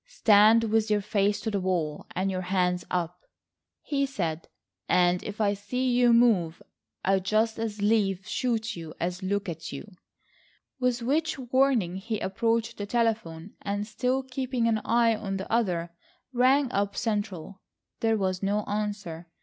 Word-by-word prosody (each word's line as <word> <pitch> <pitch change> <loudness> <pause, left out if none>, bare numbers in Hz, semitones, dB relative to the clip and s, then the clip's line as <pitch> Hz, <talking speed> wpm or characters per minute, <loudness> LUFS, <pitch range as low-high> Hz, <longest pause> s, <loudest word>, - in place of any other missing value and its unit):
"Stand 225 - +5
with 220 0 +1
your 210 -1 +2
face 205 0 +1
to 220 - -2
the 200 - 0
wall 175 -5 -2
and 190 +2 0
your 185 -1 -2
hands 180 -1 0
up," 180 0 -2 0.6
he 280 -2 0
said; 170 - -3 0.4
"and 180 0 +3
if 210 +1 -7
I 205 -2 +2
see 250 +6 -2
you 245 0 +4
move 215 -9 +3 0.5
I'd 190 0 +2
just 220 +3 +1
as 215 -2 -3
lief 205 -2 +1
shoot 235 -1 -1
you 165 -2 -8
as 180 +2 -2
look 200 +1 -1
at 165 -2 -6
you," 140 +9 -8 0.9
with 250 -1 0
which 310 +5 0
warning 250 -8 +1
he 215 +2 -3
approached 230 +3 -1
the 205 - -5
telephone 215 -7 -1
and, 205 +1 -2
still 250 +4 -1
keeping 255 -2 -2
an 220 -2 +1
eye 230 0 +3
on 195 -2 -4
the 190 - -5
other, 175 -7 0 0.4
rang 260 +2 +3
up 200 0 -1
central. 205 -5 -3 0.4
There 225 -1 +2
was 185 -2 -1
no 205 +2 0
answer. 205 -5 -4
210 Hz, 160 wpm, -27 LUFS, 185-230 Hz, 0.9 s, Stand